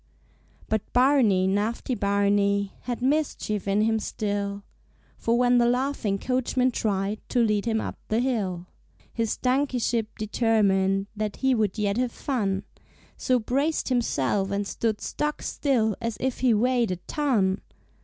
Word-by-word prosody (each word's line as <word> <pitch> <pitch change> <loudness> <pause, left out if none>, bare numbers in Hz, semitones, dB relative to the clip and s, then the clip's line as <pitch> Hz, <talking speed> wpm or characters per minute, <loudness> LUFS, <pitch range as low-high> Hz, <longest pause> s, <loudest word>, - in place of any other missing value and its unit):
But 220 -1 0
Barney, 245 -8 +4
naughty 210 +6 -1
Barney, 200 -1 +1
Had 245 0 -3
mischief 260 -8 0
in 200 +1 +2
him 220 0 +2
still; 200 -1 -3 0.6
For 230 +1 +1
when 245 0 +4
the 235 - +4
laughing 245 -5 0
coachman 255 +2 0
tried 205 -2 -1
To - - -2
lead 210 -3 +2
him 220 -1 +1
up - - -5
the 220 - 0
hill, 200 -9 -1 0.5
His 225 -2 -1
donkeyship 250 -4 0
determined 200 -3 +2
That 210 -1 -3
he 265 -1 +1
would 215 -4 0
yet 205 0 0
have 250 -1 0
fun, 205 -9 -2 0.5
So 255 - +1
braced 275 +8 0
himself 200 - 0
and 200 0 -1
stood 220 +1 -2
stock 300 0 -3
still 230 -7 +1
As 230 -1 -3
if 260 -1 -2
he 255 -1 +3
weighed 240 +1 +2
a 180 - -1
ton! 200 - 0
220 Hz, 145 wpm, -26 LUFS, 200-250 Hz, 0.6 s, Barney